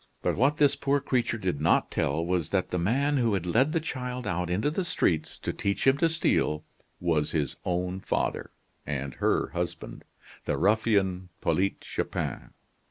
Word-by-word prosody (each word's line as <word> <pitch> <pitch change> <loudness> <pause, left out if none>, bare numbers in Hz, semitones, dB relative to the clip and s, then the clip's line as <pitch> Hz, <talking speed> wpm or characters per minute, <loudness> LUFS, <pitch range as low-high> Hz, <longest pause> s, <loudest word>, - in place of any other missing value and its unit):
But - - +1
what 140 +6 +3
this 145 -1 +4
poor 140 0 +1
creature 125 -4 0
did 90 -8 -2
not 80 - +3
tell 80 +4 0
was 90 -3 0
that 95 -2 0
the 90 - 0
man 140 +11 +1
who 115 -5 +2
had 90 -3 -2
led 125 - +3
the 165 - +1
child 125 -5 -4
out 90 -3 -1
into 105 +11 +1
the 185 +4 -1
streets, 80 - 0
to - - -3
teach 100 0 -1
him 135 +1 +4
to 165 - +4
steal, 80 - +1 0.4
was 80 -4 0
his 75 -5 0
own 90 +1 -1
father, - - -1 0.3
and 70 -2 -3
her - - +2
husband - - -5 0.4
the - - 0
ruffian, 100 -4 +2
Polyte 90 +4 0
Chupin. - - -3
100 Hz, 170 wpm, -28 LUFS, 85-135 Hz, 0.4 s, this